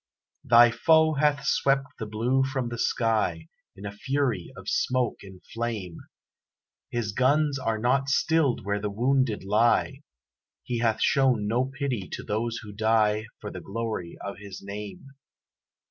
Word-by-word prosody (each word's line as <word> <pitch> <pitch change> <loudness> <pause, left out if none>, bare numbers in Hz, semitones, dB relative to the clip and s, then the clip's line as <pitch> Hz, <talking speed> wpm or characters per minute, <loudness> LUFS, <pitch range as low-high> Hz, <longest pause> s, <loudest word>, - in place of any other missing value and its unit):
Thy 120 0 +7
foe 160 +4 +4
hath 145 0 +1
swept 135 0 +2
the 110 - -4
blue 120 +5 +1
from 130 -2 -2
the 120 -1 -6
sky 105 -11 0 0.3
In 100 - -10
a 100 - -4
fury 130 - -2
of - - -11
smoke 125 -2 0
and 95 -2 -13
flame; 110 -7 -4 0.9
His 115 -4 -2
guns 140 +5 +2
are 115 -3 -1
not 130 +4 +1
stilled 150 - +1
where 100 0 -1
the 105 - -2
wounded 120 +1 +1
lie, 115 +7 +2 0.6
He 120 -1 -3
hath 115 -2 +1
shown 130 -6 +3
no 120 +5 +1
pity 135 - -4
to - - -5
those 115 +2 -2
who 105 -1 -9
die 110 0 +2
For - - -6
the - - -8
glory 110 -5 -5
of 100 0 -6
his 100 -1 -9
name. 105 - -7
115 Hz, 150 wpm, -26 LUFS, 105-135 Hz, 0.9 s, Thy